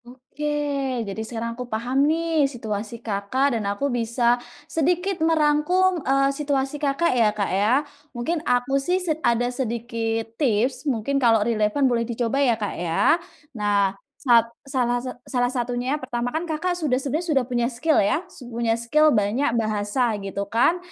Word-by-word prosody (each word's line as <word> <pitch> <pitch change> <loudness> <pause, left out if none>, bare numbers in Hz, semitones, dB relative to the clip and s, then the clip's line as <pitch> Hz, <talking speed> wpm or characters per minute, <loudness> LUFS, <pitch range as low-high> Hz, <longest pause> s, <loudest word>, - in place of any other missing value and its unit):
Oke, 260 +4 -9 0.6
jadi 200 +2 -5
sekarang 230 0 -4
aku 250 +1 -6
paham 240 +4 -2
nih 320 -3 +1
situasi 220 -3 -5
Kakak 225 +7 0
dan 225 -2 -1
aku 205 +7 -2
bisa 235 +1 +1 0.2
sedikit 355 +4 0
merangkum, 325 +3 +2
eee, 275 0 +2
situasi 275 -1 -1
Kakak 290 +3 +1
ya, 230 -4 +4
Kak, 200 -3 -1
ya. 205 +5 +3 0.4
Mungkin 295 +7 -2
aku 270 0 +1
sih 355 +6 +1
sed 315 -2 -1
ada 235 -2 +2
sedikit 230 -2 -2 0.2
tips, 255 +3 +1
mungkin 275 +3 0
kalau 225 -4 +4
relevan 220 +4 +1
boleh 240 -3 +2
dicoba 235 +3 -1
ya, 240 -5 +3
Kak, 210 -2 -3
ya. 175 - +2 0.3
Nah, 205 -3 +1 0.3
sat 235 -3 +5 0.2
salah 245 -3 0
sat 255 0 -6
salah 250 -3 0
satunya 245 -1 -2
yang - - -14
pertama 245 -1 -2
kan 315 +6 -3
Kakak 345 +2 -2
sudah 295 -7 0
sebenernya 300 +6 -2
sudah 270 -2 +3
punya 240 -1 +1
skill, 305 +7 +1
ya, 205 - +2
sud 250 -8 -12
punya 230 -1 0
skill 300 +7 +3
banyak, 225 +2 +1
bahasa, 215 +2 0
gitu 195 0 -4
kan, 230 - +2
245 Hz, 165 wpm, -23 LUFS, 225-285 Hz, 0.6 s, sat